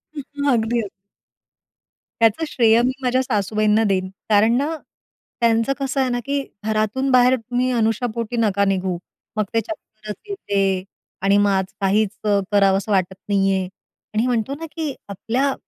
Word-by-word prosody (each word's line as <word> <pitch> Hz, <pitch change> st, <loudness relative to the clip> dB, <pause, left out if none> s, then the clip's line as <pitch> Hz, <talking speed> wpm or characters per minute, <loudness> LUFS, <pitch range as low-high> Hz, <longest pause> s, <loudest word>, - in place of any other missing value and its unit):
हं, 290 Hz, -, -4 dB, 0.2 s
हं. 285 Hz, 0 st, +2 dB
अगदी, 230 Hz, 0 st, +1 dB
अगदी. 210 Hz, -, -5 dB, 1.3 s
त्याचं 225 Hz, +7 st, +3 dB
श्रेय 230 Hz, -4 st, +4 dB
मी 250 Hz, +2 st, +2 dB
माझ्या 255 Hz, 0 st, +2 dB
सासूबाईंना 215 Hz, -1 st, +1 dB
देईन 185 Hz, -1 st, 0 dB, 0.2 s
कारण 220 Hz, +2 st, +4 dB
ना 295 Hz, +5 st, -1 dB, 0.7 s
त्यांचं 230 Hz, +2 st, +3 dB
कसं 275 Hz, 0 st, -1 dB
आहे 260 Hz, -, +1 dB
ना 245 Hz, 0 st, -1 dB
की 280 Hz, 0 st, 0 dB, 0.2 s
घरातून 220 Hz, +5 st, 0 dB
बाहेर 250 Hz, 0 st, +5 dB
तुम्ही 245 Hz, +1 st, -1 dB
अनशापोटी 230 Hz, 0 st, -1 dB
नका 200 Hz, -3 st, +2 dB
निघू. 190 Hz, -2 st, 0 dB, 0.4 s
मग 215 Hz, -, +3 dB
ते 225 Hz, -, +2 dB
चक्करच 215 Hz, -5 st, -8 dB
येते 195 Hz, -, 0 dB, 0.4 s
आणि 195 Hz, +1 st, +4 dB
मग 205 Hz, 0 st, +3 dB
आज 190 Hz, -1 st, +1 dB, 0.2 s
काहीच 200 Hz, +2 st, +2 dB
अ, 205 Hz, -1 st, +3 dB
करावसं 195 Hz, 0 st, +3 dB
वाटत 190 Hz, -1 st, +1 dB
नाही 195 Hz, -1 st, +3 dB
आहे. 190 Hz, -1 st, -1 dB, 0.5 s
आणि 220 Hz, +3 st, +1 dB
म्हणतो 245 Hz, +2 st, 0 dB
ना 325 Hz, -, -5 dB
की 315 Hz, -4 st, -3 dB, 0.2 s
आपल्या 250 Hz, +8 st, -1 dB
220 Hz, 155 wpm, -21 LUFS, 200-250 Hz, 1.3 s, बाहेर